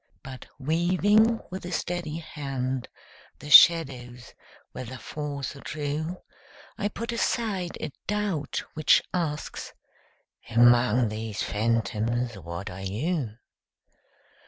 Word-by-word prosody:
But 130 Hz, -1 st, -9 dB
weaving 185 Hz, -, +3 dB
with 185 Hz, -, -6 dB
a 175 Hz, -, -6 dB
steady 175 Hz, -2 st, -3 dB
hand 135 Hz, -5 st, -4 dB, 0.5 s
The 150 Hz, -, -9 dB
shadows, 125 Hz, -9 st, +6 dB, 0.4 s
whether 130 Hz, +1 st, -7 dB
false 145 Hz, 0 st, -5 dB
or 140 Hz, -, -11 dB
true, 155 Hz, +4 st, -4 dB, 0.5 s
I 205 Hz, -, -1 dB
put 230 Hz, +3 st, -5 dB
aside 215 Hz, -6 st, -1 dB
a 155 Hz, -, -4 dB, 0.2 s
doubt 205 Hz, -8 st, -1 dB
which 155 Hz, -, +4 dB
asks 160 Hz, -5 st, -3 dB, 0.8 s
"Among 120 Hz, 0 st, +5 dB
these 110 Hz, 0 st, -4 dB
phantoms 115 Hz, +2 st, 0 dB
what 90 Hz, +2 st, -6 dB
are 95 Hz, +2 st, -8 dB
you?" 115 Hz, -, -2 dB
140 Hz, 105 wpm, -27 LUFS, 120-175 Hz, 0.8 s, shadows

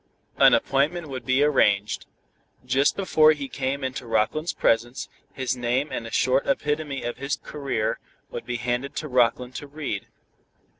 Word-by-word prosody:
An -, -, +7 dB
appointment 155 Hz, +4 st, 0 dB
would 130 Hz, -3 st, -6 dB
be 130 Hz, +2 st, +4 dB
arranged. 105 Hz, -8 st, +2 dB, 0.6 s
Just 135 Hz, +2 st, +2 dB
before 155 Hz, -5 st, +5 dB
he 145 Hz, -2 st, -5 dB
came 135 Hz, +1 st, -3 dB
into 130 Hz, -1 st, -4 dB
Rockland's 115 Hz, +9 st, +1 dB
presence, 120 Hz, +4 st, 0 dB, 0.2 s
his 130 Hz, -2 st, -2 dB
name 125 Hz, +4 st, -1 dB
and 115 Hz, -, -4 dB
a -, -, -9 dB
short 130 Hz, +3 st, +2 dB
epitome 150 Hz, 0 st, -1 dB
of 120 Hz, -, -4 dB
his 140 Hz, +2 st, -2 dB
career 140 Hz, -7 st, -3 dB, 0.3 s
would -, -, -6 dB
be 120 Hz, -, -2 dB
handed 120 Hz, +3 st, -2 dB
to 155 Hz, -, -3 dB
Rockland 125 Hz, -1 st, +2 dB
to 145 Hz, -, -7 dB
read. 140 Hz, -9 st, -4 dB
135 Hz, 155 wpm, -25 LUFS, 120-145 Hz, 0.6 s, An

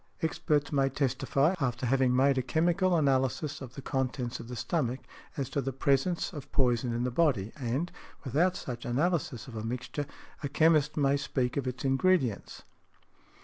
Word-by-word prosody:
Experts 150 Hz, -2 st, 0 dB
may 135 Hz, -2 st, +2 dB
testify, 135 Hz, +3 st, +1 dB
after 125 Hz, -3 st, -1 dB
having 130 Hz, 0 st, +3 dB
made 135 Hz, +2 st, +4 dB
a 130 Hz, -, +1 dB
chemical 170 Hz, +7 st, +2 dB
analysis 140 Hz, +1 st, +1 dB
of 130 Hz, -2 st, -9 dB
the 140 Hz, -, -8 dB
contents 130 Hz, -2 st, -2 dB
of -, -, -8 dB
the 125 Hz, -, -6 dB
stomach, 125 Hz, +1 st, -1 dB, 0.4 s
as 135 Hz, -3 st, -1 dB
to 140 Hz, +2 st, -1 dB
the 135 Hz, +1 st, -2 dB
presence 140 Hz, +8 st, +1 dB
of 145 Hz, -4 st, -8 dB
poison 120 Hz, -2 st, +2 dB
in 120 Hz, +1 st, -1 dB
the 125 Hz, -, -1 dB
body; 120 Hz, -, +1 dB
and, 135 Hz, +5 st, -2 dB, 0.3 s
without 160 Hz, +7 st, +2 dB
such 120 Hz, -7 st, -6 dB
analysis 135 Hz, -, -1 dB
of 120 Hz, -, -9 dB
a 110 Hz, -, -4 dB
mixture, 125 Hz, +5 st, -4 dB, 0.3 s
a 140 Hz, -, -3 dB
chemist 155 Hz, 0 st, +3 dB
may 140 Hz, -1 st, +3 dB
speak 130 Hz, -3 st, -1 dB
of 140 Hz, -2 st, -1 dB
its 125 Hz, +1 st, -4 dB
ingredients. 135 Hz, -, +1 dB
135 Hz, 170 wpm, -30 LUFS, 125-150 Hz, 0.4 s, made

